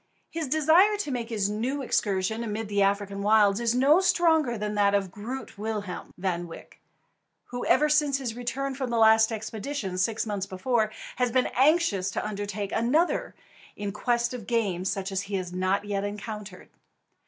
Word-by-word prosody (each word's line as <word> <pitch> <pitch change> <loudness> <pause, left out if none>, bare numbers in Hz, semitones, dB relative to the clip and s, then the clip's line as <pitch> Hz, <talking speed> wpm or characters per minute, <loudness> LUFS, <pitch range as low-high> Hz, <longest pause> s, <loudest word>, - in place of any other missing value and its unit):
His 325 -3 -3
desire 320 +9 +4
to 350 -9 -3
make 240 -2 -3
his 210 -4 0
new 245 +7 -2
excursion 210 -1 0
amid 220 -1 -4
the 205 -1 +1
African 200 0 0
wilds 205 0 +4
is 235 0 +1
no 280 +7 +5
stronger 320 -9 +2
than 210 0 -3
that 200 -1 +3
of 195 -2 -1
"Groot 225 +2 -7
Willem" 210 -4 -4
Van 175 -2 -2
Wyk, 165 - -12 0.7
who 245 0 -4
ever 300 - +4
since 300 -2 +2
his 245 -5 -4
return 265 +3 -3
from 260 -1 -4
the 235 - -1
last 220 0 +5
expedition, 220 -2 -4
six 220 +5 0
months 200 -3 -3
before, 215 +3 0 0.3
has 250 -1 +1
been 255 +1 +2
anxious 265 - +3
to 195 - -3
undertake 205 -1 -4
another 275 +10 +1 0.4
in 205 -1 -4
quest 240 +3 0
of 235 -5 -7
game 200 -7 0
such 195 +1 -2
as 190 0 -1
he 200 0 -5
has 180 -2 -4
not 185 +2 0
yet 200 -1 -2
encountered. 210 -1 -7
220 Hz, 175 wpm, -27 LUFS, 200-255 Hz, 0.7 s, no